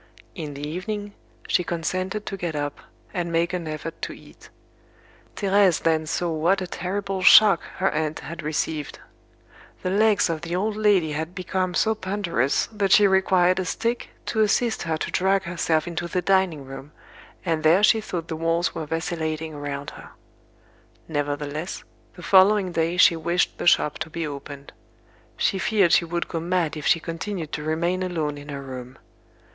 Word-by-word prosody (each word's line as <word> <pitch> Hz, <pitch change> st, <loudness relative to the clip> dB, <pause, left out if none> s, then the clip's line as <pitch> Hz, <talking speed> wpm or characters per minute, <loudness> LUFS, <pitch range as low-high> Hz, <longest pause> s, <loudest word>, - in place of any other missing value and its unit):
In 150 Hz, -5 st, -6 dB
the 145 Hz, +1 st, -5 dB
evening, 205 Hz, +5 st, -5 dB, 0.3 s
she 180 Hz, -, +2 dB
consented 185 Hz, +5 st, -3 dB
to 195 Hz, -, -4 dB
get 175 Hz, -4 st, -4 dB
up, 145 Hz, -1 st, -3 dB, 0.3 s
and 175 Hz, -2 st, -2 dB
make 170 Hz, +2 st, +1 dB
an 175 Hz, -3 st, -3 dB
effort 155 Hz, +1 st, -6 dB
to -, -, -4 dB
eat. -, -, -16 dB, 0.9 s
Thérèse 195 Hz, -3 st, +3 dB
then 160 Hz, -1 st, +1 dB
saw 170 Hz, +2 st, -1 dB
what 165 Hz, +5 st, +2 dB
a 185 Hz, -, -3 dB
terrible 190 Hz, +2 st, -3 dB
shock 205 Hz, +2 st, +8 dB, 0.2 s
her 190 Hz, 0 st, +1 dB
aunt 155 Hz, 0 st, -2 dB
had 170 Hz, +1 st, -7 dB
received. 155 Hz, -1 st, -3 dB, 0.9 s
The 185 Hz, -, -1 dB
legs 210 Hz, +1 st, +3 dB
of 165 Hz, -2 st, -3 dB
the 170 Hz, 0 st, -3 dB
old 210 Hz, +3 st, -1 dB
lady 205 Hz, -7 st, +3 dB
had 160 Hz, +4 st, -4 dB
become 185 Hz, -1 st, -2 dB
so 220 Hz, +5 st, +3 dB
ponderous 185 Hz, -, 0 dB
that 200 Hz, -3 st, -1 dB
she 205 Hz, +1 st, +7 dB
required 190 Hz, -1 st, +3 dB
a 185 Hz, -, -1 dB
stick 235 Hz, +5 st, -2 dB, 0.2 s
to 220 Hz, -, 0 dB
assist 220 Hz, +2 st, +1 dB
her 160 Hz, -1 st, -1 dB
to -, -, -4 dB
drag 190 Hz, +1 st, +2 dB
herself 165 Hz, -3 st, 0 dB
into 175 Hz, 0 st, -3 dB
the 180 Hz, +1 st, -2 dB
dining 185 Hz, -6 st, +1 dB
room, 135 Hz, +3 st, -10 dB, 0.5 s
and 160 Hz, -1 st, 0 dB
there 165 Hz, +6 st, +4 dB
she 220 Hz, +1 st, +5 dB
thought 175 Hz, -5 st, -5 dB
the 160 Hz, -, -4 dB
walls 165 Hz, +2 st, 0 dB
were 155 Hz, -, -5 dB
vacillating 160 Hz, -1 st, -3 dB
around 145 Hz, -1 st, -5 dB
her. -, -, -12 dB, 1.0 s
Nevertheless, 145 Hz, +2 st, -3 dB, 0.3 s
the 180 Hz, -, -11 dB
following 190 Hz, +2 st, +5 dB
day 165 Hz, +1 st, 0 dB
she 170 Hz, -, +6 dB
wished 170 Hz, +2 st, 0 dB
the -, -, -2 dB
shop 150 Hz, -3 st, +3 dB
to 160 Hz, 0 st, -4 dB
be 165 Hz, +1 st, -4 dB
opened. 140 Hz, -1 st, -8 dB, 0.6 s
She 195 Hz, -, +1 dB
feared 200 Hz, -5 st, +2 dB
she 170 Hz, -, +4 dB
would 170 Hz, +1 st, -3 dB
go 165 Hz, -, -3 dB
mad 170 Hz, -2 st, 0 dB
if 150 Hz, -, -4 dB
she 165 Hz, -, +4 dB
continued 165 Hz, 0 st, -5 dB
to -, -, -4 dB
remain 170 Hz, +4 st, -1 dB
alone 160 Hz, -5 st, -2 dB
in 145 Hz, +1 st, -11 dB
her 140 Hz, -1 st, -5 dB
room. 130 Hz, -1 st, -8 dB
170 Hz, 175 wpm, -24 LUFS, 155-190 Hz, 1.0 s, shock